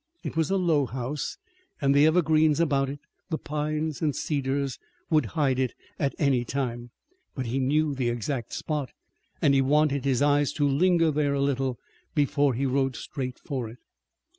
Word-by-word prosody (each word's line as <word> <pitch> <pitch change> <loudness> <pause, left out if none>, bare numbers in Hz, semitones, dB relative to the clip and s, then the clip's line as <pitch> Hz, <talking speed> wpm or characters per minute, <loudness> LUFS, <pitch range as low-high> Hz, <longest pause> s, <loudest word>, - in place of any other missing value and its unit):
It - - -5
was 160 -2 +1
a 195 - +2
low 160 -7 +2
house, 130 +5 -4 0.4
and 140 -1 +3
the 145 +2 +6
evergreens 155 -2 +3
about 140 -4 +2
it, 145 +1 -6 0.3
the 160 - -1
pines 150 0 -3
and 150 -3 +1
cedars 140 -2 -1 0.3
would 155 -6 +3
hide 135 -4 +2
it 130 -2 0 0.2
at 140 -2 0
any 135 -5 +2
time. 120 -2 -3 0.5
But 130 - -3
he 120 +4 -1
knew 150 +3 +2
the 130 -3 0
exact 120 +1 -3
spot, 150 -4 -3 0.5
and 140 - +5
he 135 - +4
wanted 140 0 +2
his 135 -1 +2
eyes 145 0 +3
to 145 -2 +1
linger 165 +3 +3
there 145 -1 +1
a - - -1
little 135 -2 0 0.4
before 145 -2 +2
he 135 +4 0
rode 135 -1 +1
straight 130 -1 -5
for 130 -6 -4
it. 115 - -12
140 Hz, 175 wpm, -27 LUFS, 130-150 Hz, 0.5 s, the